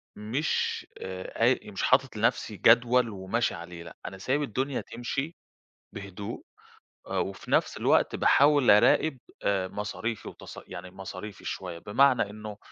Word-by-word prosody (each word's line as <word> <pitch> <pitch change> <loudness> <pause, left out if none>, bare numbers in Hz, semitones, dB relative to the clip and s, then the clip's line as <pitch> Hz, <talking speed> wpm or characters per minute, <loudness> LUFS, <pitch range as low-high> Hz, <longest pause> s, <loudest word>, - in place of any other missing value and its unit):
مش 115 +9 -1 0.2
آآ 95 +3 -6
أي 120 -3 +2
مش 100 - -4
حاطط 130 -1 +3
لنَفْسي 105 -1 0
جدول 120 +4 +5
وماشي 100 +3 -1
عليه 85 -1 -8
لأ 85 - -12
أنا 95 - -6
سايب 135 +9 0
الدنيا 135 +1 -2
تمشي، 135 +7 -4 0.6
بهدوء، 100 0 -7 0.6
آآ - - -3
وفي 95 - -4
نَفْس - - +2
الوقت - - +3
باحاول 145 -2 +5
أراقب 130 +8 +5 0.3
آآ 95 -2 +1
مصاريفي 105 +3 -4
وتص - - -9
يعني 90 +2 -8
مصاريفي 95 +1 -8
شويّة 90 -3 -5
بمعنى 115 +2 +3
إنّه، 105 0 -8
105 Hz, 135 wpm, -28 LUFS, 95-125 Hz, 0.6 s, جدول